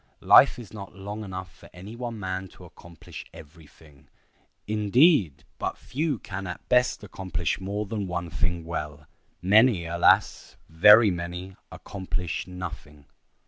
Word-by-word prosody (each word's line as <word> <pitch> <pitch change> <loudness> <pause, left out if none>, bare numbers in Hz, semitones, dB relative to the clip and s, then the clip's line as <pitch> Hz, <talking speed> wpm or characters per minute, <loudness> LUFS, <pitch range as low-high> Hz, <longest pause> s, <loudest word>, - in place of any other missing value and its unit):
Life - - +7
is 120 -4 -11
not 100 -2 -9
long 100 +2 -7
enough 95 -2 -8
for - - -16
any 95 +6 -10
one 120 -2 -6
man 95 -1 -4
to - - -13
accomplish 85 -2 -12
every 80 +1 -14
thing. 75 -3 -21 0.6
Indeed, 105 - +3 0.2
but - - -3
few 150 0 -2
can 95 -2 -7
at 90 - -8
best 125 -3 +2
accomplish 95 -5 -3
more 100 +3 -3
than 105 -2 -4
one 90 -2 -4
thing 85 0 -2
well. 75 -3 -6 0.4
Many—alas! 95 -5 +3
very 105 +6 +7
many—accomplish 90 +1 -6
nothing. 80 -5 -9
95 Hz, 130 wpm, -26 LUFS, 85-105 Hz, 0.6 s, Life